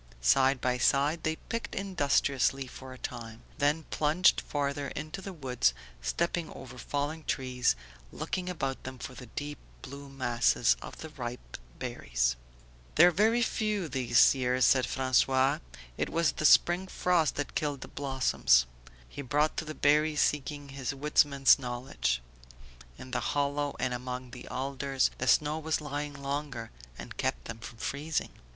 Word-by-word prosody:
Side 130 - +4
by 125 0 0
side 145 +6 +2
they 160 0 0
picked 230 +7 -5
industriously 140 -7 +1
for 130 +1 -10
a 130 - -9
time, 115 -2 -7 0.2
then 150 +3 +2
plunged 155 +5 +3
farther 140 -1 -2
into 155 +7 -6
the 195 - -6
woods, 125 - 0 0.3
stepping 170 - -1
over 125 -1 -10
fallen 145 +4 -3
trees, 125 - 0 0.4
looking 185 -1 -3
about 135 -7 -3
them 130 0 -7
for 125 - -7
the 125 0 -10
deep 145 +5 -6 0.2
blue 140 +1 -9
masses 120 -3 +2
of - - -9
the 160 - -7
ripe 120 - -7 0.2
berries. - - -1 0.6
"There 175 +3 +8
are - - -1
very 220 +6 +3
few 210 -5 -1
this 130 -5 +4
year," 125 -1 0
said 130 0 +5
François. 130 0 +2 0.4
"It - - 0
was 165 -1 +2
the 155 - -3
spring 175 +5 +5
frosts 180 -4 +1
that 145 - -3
killed 145 -3 -2
the - - -7
blossoms." 130 - +2 0.4
He 100 - -7
brought 145 +3 +1
to 160 - -2
the 155 0 -6
berry 150 +1 +3
seeking 145 -1 0
his 135 0 -4
woodsman's 140 -1 +4
knowledge. 120 - -2 0.7
"In 130 - -10
the 130 - 0
hollows 145 0 -1
and 125 0 0
among 125 0 -5
the 125 - -10
alders 135 +1 -1
the 130 - -2
snow 150 +4 +3
was 160 0 -1
lying 145 -1 -4
longer 140 -4 -4 0.3
and - - -9
kept - - -1
them 115 -1 -7
from 115 +1 -10
freezing." 145 +7 -2
140 Hz, 155 wpm, -30 LUFS, 125-150 Hz, 0.7 s, There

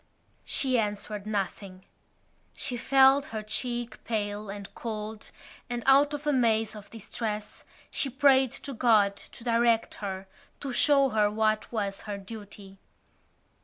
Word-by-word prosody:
She 255 -3 +1
answered 210 -1 -3
nothing. 195 -2 -4 0.7
She 250 - -4
felt 270 +3 +5
her 220 -1 -5
cheek 240 +2 -3
pale 210 -2 -2
and 200 0 -7
cold 215 -1 -6 0.4
and, 240 -1 -3
out 285 +2 +5
of 295 +1 -8
a 295 - +2
maze 225 -4 +2
of 210 -1 -11
distress, 215 -1 -5 0.3
she 275 - 0
prayed 265 0 +4
to 275 - -5
God 215 -5 +4
to 215 - -10
direct 230 -1 +2
her, 190 -1 -4 0.3
to 275 - -4
show 275 0 +4
her 215 -3 +3
what 215 0 0
was 200 -4 -2
her 205 - -3
duty. 200 -1 -10
220 Hz, 135 wpm, -28 LUFS, 205-250 Hz, 0.7 s, felt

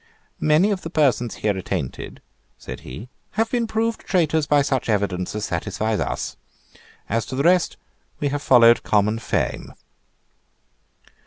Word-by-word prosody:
"Many 155 +7 +3
of 190 -2 -2
the 165 - -6
persons 130 -7 +1
here 105 -2 +2
attainted," 90 -7 -5 0.3
said - - -8
he, 70 - -9 0.3
"have 225 +2 0
been 240 -2 0
proved 225 +1 -1
traitors 160 -5 +1
by 145 -1 +4
such 135 -4 -1
evidence 100 -3 -1
as 105 - -2
satisfies 105 +5 -2
us. - - -3 0.7
As 115 +2 0
to 130 - -5
the 140 - 0
rest 180 +1 +3 0.4
we 145 - 0
have 145 +1 -2
followed 120 -4 +6
common 105 +2 +1
fame." - - -2
130 Hz, 145 wpm, -22 LUFS, 105-165 Hz, 0.7 s, followed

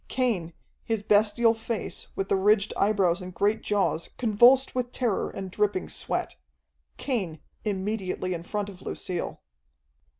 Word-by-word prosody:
Cain, 210 -11 0 0.3
his 225 -2 -2
bestial 215 +2 +4
face, 225 -1 -4
with 195 - -2
the - - +2
ridged 200 +1 +3
eyebrows 195 -3 +2
and 180 0 -7
great 205 +4 +1
jaws 200 -5 0
convulsed 245 +4 +5
with 250 -1 -2
terror 240 -6 0
and 190 -1 -6
dripping 205 -2 0
sweat. - - -3 0.6
Cain, 190 - -2 0.2
immediately 190 -2 -2
in 170 - -4
front 205 +4 -3
of 190 -2 -11
Lucille. 180 -2 -4
205 Hz, 135 wpm, -27 LUFS, 185-225 Hz, 0.6 s, convulsed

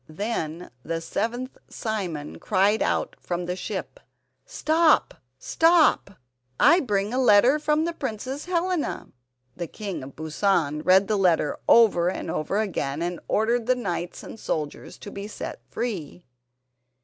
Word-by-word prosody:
Then 170 -2 -4
the 165 +4 -3
seventh 240 +9 -3
Simon 185 - -4
cried 205 +2 +2
out - - 0
from 175 0 -3
the 180 +1 -2
ship: - - -5 0.5
"Stop! 325 -8 +3 0.2
stop! 325 - +3 0.4
I 335 +7 +6
bring 210 - -1
a 255 - +1
letter 245 +4 +5
from 305 +1 +1
the 340 - -2
Princess 265 0 -5
Helena!" 360 -2 -1 0.5
The 175 - -4
King 200 -1 -6
of 130 +1 -10
Busan 155 -1 0
read 190 +3 +5
the 215 - +1
letter 170 -5 +2
over 200 -7 +5
and - - -4
over 155 +6 -2
again, 165 -8 -2
and 175 0 -3
ordered 230 +2 +1
the 255 - +4
knights 180 -7 -4
and 225 - -10
soldiers 150 -7 -4
to 205 - -10
be 200 +1 -6
set 215 - -7
free. 185 - -4
205 Hz, 140 wpm, -25 LUFS, 175-250 Hz, 0.5 s, I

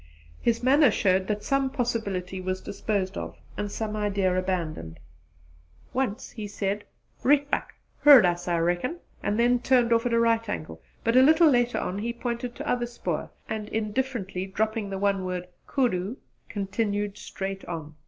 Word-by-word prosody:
His 235 +1 +1
manner 280 +2 +6
showed 190 -2 +2
that 210 -1 -2
some 275 -1 +1
possibility 200 -8 -2
was 185 0 -2
disposed 200 -2 -2
of - - -7 0.2
and 205 -1 -3
some 215 0 -3
idea 200 -3 +1
abandoned. 170 - -2 0.9
Once 250 -5 -2
he 215 -3 -6
said 200 0 -2 0.4
"Rietbuck! 285 +1 +2 0.2
Heard 285 -7 +9
us 175 0 0
I 175 -1 +2
reckon," 175 - 0 0.2
and 205 - 0
then 245 +1 +4
turned 245 -1 +3
off 230 +1 +2
at 235 - -1
a 230 - +4
right 230 -1 +2
angle; 80 0 -5 0.2
but 230 +1 +2
a 255 - +8
little 315 +3 +6
later 245 -1 +2
on 190 +2 -2
he 235 +3 -2
pointed 240 0 -4
to - - -6
other 240 -1 0
spoor 240 - -3 0.2
and, 215 -1 -4
indifferently 215 -4 -2
dropping 215 +1 -1
the 195 - -3
one 195 -1 +1
word 180 -1 -3 0.2
'Koodoo,' 230 -5 0 0.3
continued 205 0 -2
straight 195 0 -5
on. 160 -3 -6
210 Hz, 165 wpm, -27 LUFS, 190-240 Hz, 0.9 s, Heard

